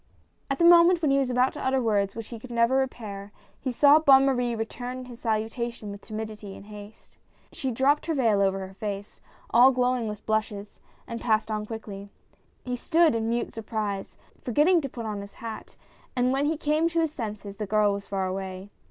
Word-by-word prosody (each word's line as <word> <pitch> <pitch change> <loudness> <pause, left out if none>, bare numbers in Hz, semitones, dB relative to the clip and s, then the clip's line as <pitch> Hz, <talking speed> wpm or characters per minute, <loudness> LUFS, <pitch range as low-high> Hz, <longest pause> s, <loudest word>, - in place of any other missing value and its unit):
At 275 - -1
the 340 - +3
moment 340 0 +7
when 295 - +3
he 275 - +4
was 270 -2 0
about 250 +1 +2
to - - -7
utter 265 0 +2
words 205 -5 0
which 230 -1 -7
he 235 - -7
could 255 - -11
never 235 +2 +2
repair, 210 -6 -4 0.3
he 260 - -3
saw 285 +4 +6
Bonne 270 -3 +6
Marie 245 -3 +1
return 245 +3 -5
his 240 -2 -11
salutation 225 -1 -3
with 200 0 -9
timidity 215 -2 -7
and - - -13
haste. 210 0 -13 0.3
She 265 - -3
dropped 270 +6 +2
her 325 - 0
vail 225 -7 +3
over 195 -1 +1
her 190 - -14
face, 200 0 -6 0.3
all 245 +3 +7
glowing 250 -2 +1
with 210 0 -7
blushes, 215 -2 -2 0.3
and 230 0 -6
passed 220 -1 +1
on 210 0 -3
quickly. 205 -3 -7 0.6
He 250 -1 -2
stood 325 +5 +3
in 225 0 -1
mute 235 +1 -2
surprise, 210 -3 -4 0.3
forget 255 +5 +2
ting 355 -1 +4
to 275 - -4
put 235 -2 -7
on 210 -2 -4
his 200 0 -11
hat, 225 -1 -8 0.4
and 250 0 +2
when 280 +2 +1
he 315 +1 0
came 305 +2 +1
to 335 0 +1
his 320 -2 0
senses 210 -5 -6
the 210 -1 -4
girl 210 0 +3
was 200 0 -6
far 195 -1 -1
away. 190 +1 -5
230 Hz, 205 wpm, -26 LUFS, 210-265 Hz, 0.6 s, moment